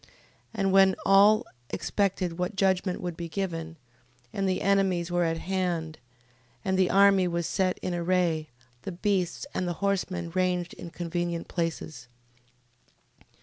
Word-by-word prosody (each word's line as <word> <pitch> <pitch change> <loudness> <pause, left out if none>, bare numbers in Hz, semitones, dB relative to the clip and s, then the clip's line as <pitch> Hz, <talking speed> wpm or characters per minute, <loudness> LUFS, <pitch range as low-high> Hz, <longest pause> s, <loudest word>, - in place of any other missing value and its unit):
15:20. - - -24 0.5
And 195 -3 +1
now - - 0
when 195 -1 +6
all 210 +4 +6 0.2
expected 185 -4 -1
what 180 +3 -2
judgment 190 -1 +1
would 175 -2 -4
be 170 0 -6
given, 165 -2 -4 0.6
and 195 -1 0
the 185 - -1
enemies 190 -3 +2
were 175 0 +2
at 165 0 0
hand, 170 -3 -2 0.7
and 190 - +1
the 185 -1 +3
army 195 -1 +5
was 170 -1 -1
set 185 +1 0
in 180 - -2
array, 170 -3 0 0.3
the 190 - -6
beasts 185 +1 -1
and 180 - -1
the 175 - -1
horsemen 185 -2 -2
ranged 180 -1 0
in 170 - -9
convenient 170 0 -3
places, 160 -6 -4 1.1
15:21. - - -24
180 Hz, 150 wpm, -27 LUFS, 170-195 Hz, 1.1 s, when